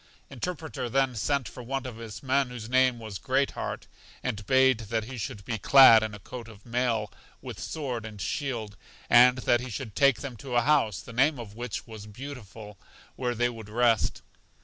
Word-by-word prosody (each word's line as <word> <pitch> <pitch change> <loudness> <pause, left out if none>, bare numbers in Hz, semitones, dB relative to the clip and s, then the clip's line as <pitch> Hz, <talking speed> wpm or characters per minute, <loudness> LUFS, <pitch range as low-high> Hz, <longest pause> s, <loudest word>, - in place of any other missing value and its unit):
Interpreter 155 -1 -4
then 135 0 +1
sent 140 +3 0
for - - -9
one 135 +2 -3
of 125 -3 -7
his 115 0 -9
men 135 0 +1
whose 120 -3 -7
name 130 0 +3
was 110 -4 -7
Great 135 +1 +1
heart, - - -5 0.4
and 105 0 -3
bade 130 -2 +4
that 110 -1 0
he 130 +4 -8
should 100 -3 -6
be 115 -3 -3
clad 125 0 +8
in 110 -1 -3
a - - -10
coat 115 +4 -9
of 110 -2 -15
mail, 120 -3 -1 0.3
with - - -8
sword 130 -7 -4
and 110 -2 -9
shield, 110 0 -3 0.4
and 125 +1 +7
that 120 0 +3
he 130 - -6
should 115 -1 -6
take 140 -3 +4
them 140 -4 -6
to 125 +3 -6
a 120 - +5
house, 140 -9 +2
the 115 - -11
name 140 +5 +3
of 115 -4 -8
which 120 0 -5
was 110 -2 -10
Beautiful, 110 -4 -10 0.4
where 125 -2 -2
they 120 +1 +2
would 115 -3 -8
rest. 115 0 +1
120 Hz, 195 wpm, -27 LUFS, 110-130 Hz, 0.4 s, clad